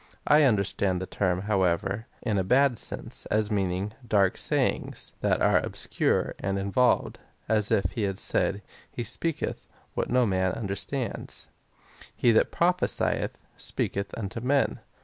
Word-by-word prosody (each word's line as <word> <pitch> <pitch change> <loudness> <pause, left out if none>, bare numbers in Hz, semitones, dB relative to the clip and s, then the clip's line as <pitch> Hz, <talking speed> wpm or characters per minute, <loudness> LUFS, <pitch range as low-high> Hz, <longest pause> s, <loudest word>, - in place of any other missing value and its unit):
I 150 +1 +6
understand 100 -5 +1
the 95 - -4
term, 95 -1 -1
however, 100 +1 0 0.2
in 110 -5 0
a 95 +6 +2
had 135 -4 +3
sense, - - -1
as 110 0 +1
meaning 95 0 -1
— 125 - -18
dark 95 -2 +3
sayings, - - 0
that - - +1
are - - +4
ohscure - - 0
and 100 +1 -1
involved, 100 +6 +1 0.3
as 105 -1 +1
if 95 -3 +1
he 115 - -4
had 95 -2 -1
said, 100 +1 0
" - - -24
He 120 - -2
speaks 165 +8 -1 0.5
what - - -2
no 125 +1 +3
one 105 -5 0
understands." 100 +7 -2 0.5
8. - - -13
He 120 - +3
that 110 - +3
prophesieth, 180 +1 0
speaketh 100 0 -2
unto 110 +1 -4
men. 135 +2 +1
105 Hz, 150 wpm, -27 LUFS, 95-120 Hz, 0.5 s, I